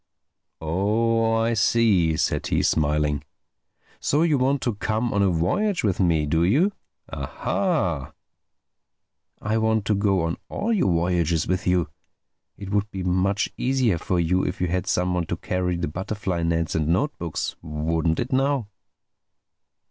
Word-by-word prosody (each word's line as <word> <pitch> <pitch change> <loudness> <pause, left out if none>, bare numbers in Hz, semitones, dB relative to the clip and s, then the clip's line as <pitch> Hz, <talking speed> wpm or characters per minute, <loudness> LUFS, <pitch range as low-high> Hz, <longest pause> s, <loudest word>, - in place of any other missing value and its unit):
"Oh, 110 +7 +1
I 115 +1 +1
see," 105 -7 +3
said - - 0
he, - - +1
smiling. 75 -1 +1 0.8
"So 150 +3 +1
you 155 -5 +2
want 135 +2 +1
to 120 - 0
come 110 +3 -1
on 100 - +2
a 100 - +3
voyage 135 - 0
with 100 -4 0
me, 85 -5 +2
do 80 +3 +1
you?—Ah 155 - -1
hah!" 90 - -1 1.3
"I 110 +2 0
want 110 -2 +1
to 105 - +2
go 100 -3 +1
on 80 0 -2
all 230 +3 -1
your 185 - +2
voyages 85 -2 +1
with 95 0 -2
you. 90 -2 +2 0.7
It 100 -1 -7
would 105 0 0
be 95 -2 -5
much 95 +3 0
easier 125 -8 +1
for 90 +2 -1
you 90 +2 +1
if - - -3
you 90 - +1
had 90 +1 -1
someone 90 -2 0
to - - -3
carry 90 -1 -2
the 85 - -2
butterfly 95 +2 -3
nets 85 0 0
and 75 -2 0
note 135 - +1
books. 85 -2 -3
Wouldn't 80 +1 -1
it 125 +2 -2
now?" 135 -4 +1
95 Hz, 155 wpm, -24 LUFS, 85-115 Hz, 1.3 s, see